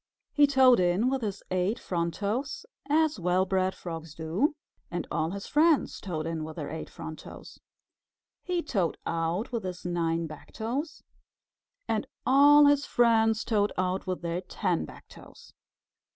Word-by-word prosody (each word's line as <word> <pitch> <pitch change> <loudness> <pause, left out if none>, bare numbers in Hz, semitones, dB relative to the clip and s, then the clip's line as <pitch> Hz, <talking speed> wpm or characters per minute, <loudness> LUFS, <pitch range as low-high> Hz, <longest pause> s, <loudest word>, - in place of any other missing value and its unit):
He 290 -1 +5
toed 260 -4 +6
in 185 +8 +2
with 270 -1 -1
his 200 -3 -4
eight 185 +5 +1
front 170 -6 -2
toes, 245 - -3 0.2
as 310 -3 +2
well 180 +2 +2
bred 190 0 0
frogs 165 -2 -7
do, 170 - 0 0.3
and 175 - -3
all 160 - 0
his 200 +2 -6
friends 310 0 +2
toed 160 -5 -4
in 165 -1 -3
with 155 0 -7
their 150 -4 -5
eight 160 - -6
front 155 -1 -8
toes. - - -12 0.8
He 355 -2 -2
toed 190 - -1
out 165 +7 -1
with 235 -2 -2
his 180 -1 -6
nine 170 -1 0
back 155 -1 -11
toes, 260 +8 -4 0.8
and - - -1 0.2
all 290 +2 +7
his 285 0 +4
friends 225 -3 +3
toed 210 -3 +1
out 185 +1 -1
with 185 -1 -3
their 170 +1 -2
ten 185 - -1
back - - -14
toes. - - -15
190 Hz, 160 wpm, -28 LUFS, 170-255 Hz, 0.8 s, all